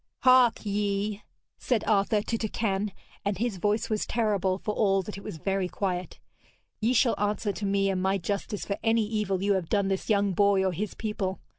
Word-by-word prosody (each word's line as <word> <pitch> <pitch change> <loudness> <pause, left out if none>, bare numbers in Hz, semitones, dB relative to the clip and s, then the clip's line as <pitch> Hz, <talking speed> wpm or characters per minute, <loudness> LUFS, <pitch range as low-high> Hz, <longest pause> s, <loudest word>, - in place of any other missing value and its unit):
'Hark 255 -3 +5
ye!' 205 0 -1 0.4
said 240 -5 0
Arthur 205 0 +2
to 230 - -2
Turquine, 210 -2 -1 0.3
and 200 -2 -1
his 225 -2 -1
voice 210 +4 0
was 215 -1 -1
terrible, 200 -5 +1
for 210 - -3
all 195 -3 +2
that 210 - -7
it 200 - -9
was - - -6
very 195 +3 -1
quiet, 185 -2 -3 0.6
'ye 225 +2 +2
shall 245 -1 +4
answer 205 0 0
to 200 0 -4
me 195 0 +2
and 190 -1 0
my 190 +1 +2
justice 200 +3 -3
for 200 - -3
any 225 -1 +3
evil 205 -3 -1
you 200 0 +3
have 185 -4 -2
done 200 -2 +1
this 195 +3 -2
young 200 -2 +2
boy 200 0 +3
or 190 - +2
his 200 +5 -4
people. 205 -3 -3
200 Hz, 195 wpm, -27 LUFS, 195-215 Hz, 0.6 s, Hark